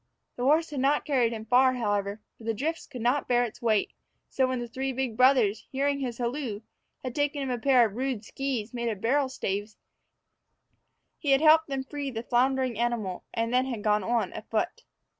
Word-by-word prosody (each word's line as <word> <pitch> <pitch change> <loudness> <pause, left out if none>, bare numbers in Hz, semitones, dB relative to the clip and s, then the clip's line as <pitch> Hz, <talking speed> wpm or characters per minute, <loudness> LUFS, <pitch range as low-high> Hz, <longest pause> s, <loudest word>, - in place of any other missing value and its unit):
The - - -7
horse 310 +3 +3
had 285 - -3
not 275 +3 +2
carried 250 -5 +2
him 220 -1 -6
far, 255 +3 +4
however, 205 -2 -1
for - - -16
the 225 0 -1
drifts 315 +8 -3
would 250 -4 -6
not 255 +4 +1
bear 245 0 +3
its 240 +1 -6
weight; 220 -3 +1 0.4
so, 260 -1 +1
when 255 0 -1
the 240 - -4
three 265 +3 -3
big 260 -3 -2
brothers, 250 -4 +3
hearing 280 +1 0
his 245 -4 -3
halloo, 240 -3 -3 0.4
had 255 -2 -4
taken 290 0 0
him 265 - -2
a 245 - -2
pair 255 -1 +5
of 210 -2 -4
rude 255 -4 -2
skees 255 -3 -3
made 235 -1 -2
of 210 -3 -4
barrel 265 +5 +1
staves, 205 -3 -4 1.4
he 290 - -3
had 270 - +4
helped 315 0 +6
them 270 -2 -3
free 285 +1 -5
the 230 -3 -5
floundering 255 -1 +1
animal, 230 -6 -2
and 230 +1 -1
had 255 +1 +4
then 235 -5 -4
gone 210 -2 +2
on 235 +3 0
afoot. - - -3
250 Hz, 200 wpm, -28 LUFS, 225-270 Hz, 1.4 s, helped